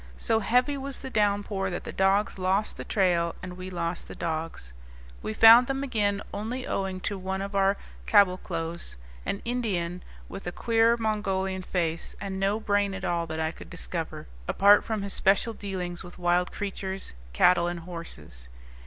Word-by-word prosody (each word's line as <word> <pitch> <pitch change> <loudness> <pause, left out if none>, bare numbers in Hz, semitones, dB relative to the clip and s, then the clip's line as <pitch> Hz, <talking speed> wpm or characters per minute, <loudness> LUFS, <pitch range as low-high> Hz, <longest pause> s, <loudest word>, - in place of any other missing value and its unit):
So 225 -1 +1
heavy 250 +6 +2
was 275 0 -5
the 265 - -6
downpour 205 -2 +1
that 175 - -4
the - - -6
dogs 195 +1 +2
lost 190 +3 +1
the - - -6
trail 175 -4 +1
and 180 -1 -6
we 185 +1 -7
lost 170 -1 -3
the - - -9
dogs. 160 - -4 0.5
We - - -3
found 230 +3 +8
them 270 0 -1
again 205 -6 0
only 240 +5 -4
owing 190 -1 -2
to 200 0 -3
one 190 +1 -3
of 200 +1 -4
our 195 0 +3 0.3
caboclos; 170 - +1 0.3
an 200 - -2
Indian 190 -8 -2 0.3
with 195 - -8
a - - -1
queer 230 +3 +3
Mongolian 195 -4 -1
face, 170 -2 -2
and 195 -1 -4
no 200 +3 +1
brain 205 -2 +1
at 190 0 -5
all 170 -2 0
that 160 0 -4
I 160 0 0
could - - -12
discover, - - -5 0.2
apart 205 +1 +6
from 220 -3 -2
his 200 - -4
special 200 +4 +3
dealings 185 -4 -4
with 175 -1 -11
wild 180 0 +1
creatures, 195 - -5 0.2
cattle, 170 - +4
and 175 -1 -3
horses. 75 - -9
195 Hz, 170 wpm, -27 LUFS, 175-210 Hz, 0.5 s, found